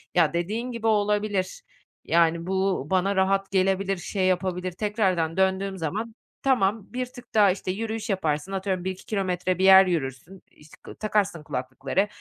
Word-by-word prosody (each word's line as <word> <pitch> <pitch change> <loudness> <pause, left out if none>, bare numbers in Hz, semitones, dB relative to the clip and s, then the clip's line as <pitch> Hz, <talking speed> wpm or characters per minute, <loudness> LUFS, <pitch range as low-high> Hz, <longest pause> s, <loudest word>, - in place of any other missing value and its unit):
ya 170 -3 +4
dediğin 215 +9 -2
gibi 230 -1 -3
olabilir. 205 -3 0 0.4
Yani 170 0 +2
bu 190 -5 0
bana 190 +1 +1
rahat 195 +1 +1
gelebilir, 195 0 +1
şey 185 +2 -2
yapabilir, 185 0 -1
tekrardan 185 -4 0
döndüğüm 190 0 +1
zaman 210 +7 -4 0.3
tamam 220 -6 +2
bir 255 0 -1
tık 245 -1 -15
daha 205 -3 +5
işte 185 0 -3
yürüyüş 220 +3 -4
yaparsın, 165 -3 -1
atıyorum 190 -2 -2
1-2 190 0 -5
kilometre 185 -3 -1
bir - - +1
yer 190 0 +9
yürürsün, 170 +2 -4
işte 150 +1 -18
k - - -10
takarsın 205 -6 -1
kulaklıkları, 135 +6 -2
190 Hz, 150 wpm, -25 LUFS, 180-205 Hz, 0.4 s, yer